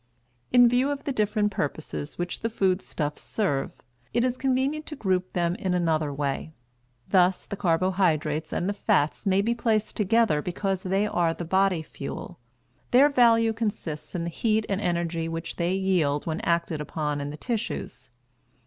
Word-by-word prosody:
In 245 -1 +7
view 250 +3 +2
of 285 -1 -3
the 280 - -2
different 210 -3 +1
purposes 150 -3 -4
which 175 0 -3
the 230 - -1
foodstuffs 185 -7 -1
serve, 145 -11 -1 0.5
it 240 - +3
is 250 -1 0
convenient 270 +4 0
to 300 - -6
group 185 -7 -1
them 170 -1 +1
in 185 0 -1
another 160 -4 +1
way. 140 +2 -3 0.6
Thus, 185 0 +3
the - - -5
carbohydrates 165 -4 +1
and 175 - -1
the 200 - 0
fats 200 -3 +1
may 195 +1 +3
be 235 +2 +1
placed 220 -2 0
together 215 -6 +2
because 190 +3 -2
they 195 +1 +1
are 175 -5 +1
the 175 - -5
body 190 -1 +2
fuel; - - -7 0.5
their 270 +4 +6
value 230 -4 +4
consists 205 -10 -4
in 170 - -1
the 170 - -3
heat 220 +4 +1
and 200 0 -1
energy 170 -3 -1
which 165 0 -5
they 175 +2 0
yield 175 -7 +1
when 160 -1 -2
acted 170 -2 0
upon 150 -1 -2
in 140 - -4
the 150 - -7
tissues. 235 +4 -4
185 Hz, 165 wpm, -26 LUFS, 165-220 Hz, 0.6 s, In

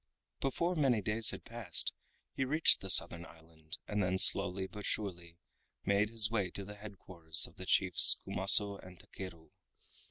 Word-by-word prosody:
Before 170 +6 -4
many 135 -8 -2
days 110 +2 +1
had - - -6
passed 115 -7 -3 0.4
he 135 - -5
reached 155 +5 +2
the 95 - -11
Southern 85 -2 +4
Island, 80 -1 -14
and 105 0 -5
then 95 0 -4
slowly 95 0 +1
but 105 +2 -13
surely 85 -6 -8 0.5
made 100 +2 -2
his 110 -1 -3
way 100 -5 -4
to 100 - -10
the 105 - -13
head 105 -1 -15
quarters 80 -5 -7
of - - -17
the - - -12
chiefs - - +4
Kumaso 100 +1 +4
and 90 -1 -17
Takeru. 85 -5 -14
100 Hz, 165 wpm, -30 LUFS, 85-110 Hz, 0.5 s, Southern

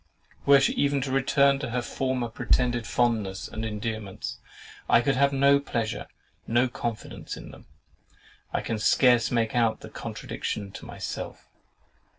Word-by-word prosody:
Were 140 0 +8
she 135 - +2
even 140 0 +1
to 135 0 -3
return 135 +1 +3
to 140 - -4
her 120 +1 -1
former 130 -2 -1
pretended 120 0 +1
fondness 110 -6 0
and 110 - -6
endearments, 110 -2 -4 0.5
I - - +7
could 135 +3 +1
have 140 +1 +4
no 140 +1 +5
pleasure, 115 -5 -3 0.4
no 120 +3 +3
confidence 120 -2 -5
in - - -10
them. - - -15 0.8
I - - 0
can 110 - -3
scarce 120 +2 +4
make 115 -2 0
out 115 -2 +2
the - - -10
contradiction 100 -2 -5
to - - -9
myself. - - -6
120 Hz, 150 wpm, -27 LUFS, 115-135 Hz, 0.8 s, Were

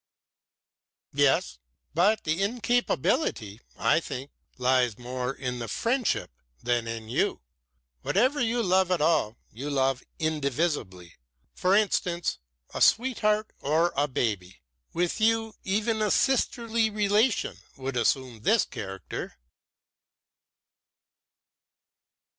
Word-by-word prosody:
"Yes, 65 -1 +2 0.3
but 195 +7 +3
the 160 +4 -1
incapability, 225 - 0 0.2
I - - +3
think, 135 -4 -7 0.3
lies 125 -3 +2
more 125 +1 -3
in 125 -2 -4
the 115 - -4
friendship 235 - 0 0.3
than 120 -1 0
in 115 -1 -5
you. 115 - 0 0.6
Whatever 255 - +2
you 235 0 +1
love 185 -1 +3
at 180 -2 +1
all, 150 -8 +2
you 135 +7 -6
love 135 -2 +1 0.2
indivisibly; 140 - -2 0.4
for 185 +2 +2
instance, 175 - 0 0.3
a - - -4
sweetheart 215 -3 +3
or 160 +5 +1
a 145 +1 +2
baby. 100 - -3 0.3
With 175 +5 -1
you 225 0 +2
even 215 +3 0
a 210 - +2
sisterly 230 -4 +1
relation 210 +3 +1 0.2
would 135 -1 -4
assume 120 -1 0
this 220 - +3
character." 95 -1 -7
160 Hz, 105 wpm, -27 LUFS, -, 0.6 s, but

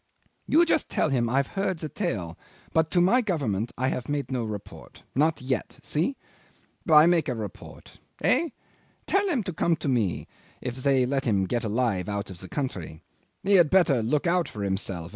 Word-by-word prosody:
You 335 +2 +5
just 325 -2 +1
tell - - +1
him 120 -4 +1
I've 135 +3 +2
heard 195 -2 -1
the 155 - -5
tale, 100 - -3 0.4
but 160 0 +2
to 175 - +2
my 230 +9 +4
Government 125 - -1
I 130 +1 +1
have 125 +1 -4
made 145 -1 -2
no 125 -2 -1
report. 105 -2 -8
Not 150 0 +1
yet. 130 -3 -2
See? 170 - -1 0.7
Why 155 -1 +7
make 170 -3 +3
a 125 - -1
report? 105 -5 -9 0.2
Eh? 315 +6 +3 0.6
Tell 395 +1 +2
him 270 -10 +1
to 180 - -4
come 170 +1 +1
to 155 - -5
me 95 - 0 0.3
if 125 0 -5
they 135 -2 +3
let 135 +1 -1
him 100 -5 +2
get 120 +4 -1
alive 110 -4 0
out 100 -1 -3
of 90 - -9
the 95 - -9
country. 90 - -5 0.4
He 200 - +2
had 175 -6 +6
better 165 -9 +4
look 140 +9 0
out 170 -3 +1
for 105 -3 -6
himself. 95 -3 -2
135 Hz, 190 wpm, -26 LUFS, 105-170 Hz, 0.7 s, Why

